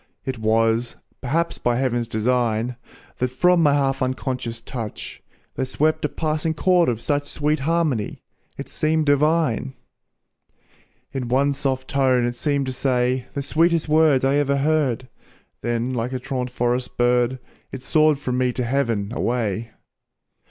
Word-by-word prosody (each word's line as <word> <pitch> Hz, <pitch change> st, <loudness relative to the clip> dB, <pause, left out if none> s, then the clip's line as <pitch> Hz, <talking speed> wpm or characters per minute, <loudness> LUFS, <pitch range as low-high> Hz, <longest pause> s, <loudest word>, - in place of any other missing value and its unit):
It 130 Hz, -3 st, -3 dB
was, 115 Hz, +2 st, +1 dB, 0.3 s
perhaps 165 Hz, +6 st, -1 dB
by 120 Hz, -1 st, +1 dB
heaven's 120 Hz, -2 st, 0 dB
design, 115 Hz, +1 st, 0 dB, 0.4 s
That 125 Hz, -, +1 dB
from 175 Hz, +7 st, +3 dB
my 145 Hz, -3 st, +4 dB
half 135 Hz, -1 st, 0 dB
unconscious 130 Hz, -2 st, -2 dB
touch, 115 Hz, -2 st, -7 dB, 0.3 s
There -, -, -2 dB
swept 155 Hz, +4 st, 0 dB
a -, -, 0 dB
passing 155 Hz, +1 st, -1 dB
chord 180 Hz, -2 st, +3 dB
of 115 Hz, -3 st, -1 dB
such 145 Hz, +4 st, -1 dB
Sweet 150 Hz, 0 st, 0 dB
harmony, 150 Hz, -7 st, -1 dB, 0.3 s
it -, -, -6 dB
seemed 155 Hz, 0 st, 0 dB
divine. 145 Hz, -3 st, +2 dB, 1.4 s
In 130 Hz, -2 st, -3 dB
one 135 Hz, +4 st, +2 dB
soft 130 Hz, -1 st, -2 dB
tone 130 Hz, -3 st, +2 dB
it 120 Hz, -, -1 dB
seemed 140 Hz, +2 st, -1 dB
to 130 Hz, -, -3 dB
say 125 Hz, -1 st, 0 dB
The 140 Hz, -, -2 dB
sweetest 165 Hz, +3 st, +2 dB
words 150 Hz, -4 st, +4 dB
I 135 Hz, +1 st, +3 dB
ever 140 Hz, -1 st, +1 dB
heard, 140 Hz, -4 st, +1 dB, 0.5 s
Then 120 Hz, +2 st, -1 dB
like 120 Hz, +1 st, -2 dB
a 130 Hz, -, -2 dB
truant 125 Hz, -1 st, -3 dB
forest 125 Hz, 0 st, -1 dB
bird, 120 Hz, +1 st, +2 dB, 0.3 s
It 130 Hz, -1 st, -7 dB
soared 155 Hz, +1 st, +3 dB
from 125 Hz, -3 st, -2 dB
me 125 Hz, -1 st, +2 dB
to 125 Hz, -, -2 dB
heaven 115 Hz, -5 st, 0 dB
away. 115 Hz, -2 st, -1 dB
130 Hz, 150 wpm, -22 LUFS, 120-145 Hz, 1.4 s, my